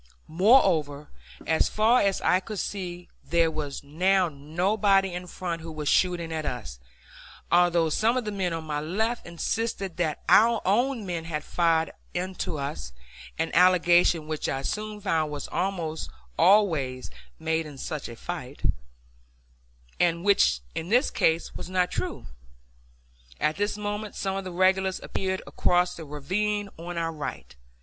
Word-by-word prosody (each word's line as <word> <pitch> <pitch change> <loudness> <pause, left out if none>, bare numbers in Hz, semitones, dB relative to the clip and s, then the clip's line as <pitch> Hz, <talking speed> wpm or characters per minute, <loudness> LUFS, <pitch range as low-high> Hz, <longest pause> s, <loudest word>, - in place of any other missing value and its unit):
Moreover, 160 - +3 0.4
as 160 0 +2
far 225 +4 +4
as 195 -1 +1
I 180 - +3
could 210 +2 -7
see, 180 -3 -4 0.2
there 165 -1 +2
was 145 -3 -5
now 180 +5 +2
nobody 190 +6 +1
in 180 +1 -5
front 170 -2 -4
who 165 0 -7
was 155 -1 -5
shooting 175 -3 +1
at 155 -1 -2
us, 65 - -5 0.7
although 175 -1 +4
some 225 +10 +2
of 250 - -2
the 210 - -2
men 190 -3 -1
on 165 -1 -3
my 150 -2 -3
left 220 +9 -1
insisted 195 +1 -3
that 160 -4 -1
our 230 +1 +6
own 235 +3 +1
men 170 -3 -4
had 150 -2 -3
fired 165 -1 +1 0.2
into 180 -2 -3
us 70 - -5 0.4
an - - -1
allegation 175 -2 +5
which 155 -1 -2
I 135 0 -2
soon 215 +3 -4
found 160 -6 0
was 145 -1 -5
almost 170 -4 -2 0.3
always 155 - +3 0.3
made 160 0 -1
in 145 -2 -10
such 150 0 -5
a 120 - -8
fight, - - -7 1.4
and 170 0 +1
which 70 - +4
in 165 +2 -4
this 245 +6 +3
case 165 +1 +1
was - - -7
not 185 -1 +1
true. 365 -1 -4 1.1
At 155 +1 +1
this 205 +1 -1
moment 210 0 -4
some 195 -1 -2
of 195 -1 -4
the 185 - -5
regulars 190 +1 +2
appeared 190 0 -3
across 180 0 +1
the 165 - -8
ravine 200 +8 -2
on 175 +1 -6
our 165 -1 -1
right. 155 -2 -7
175 Hz, 155 wpm, -26 LUFS, 160-195 Hz, 1.4 s, our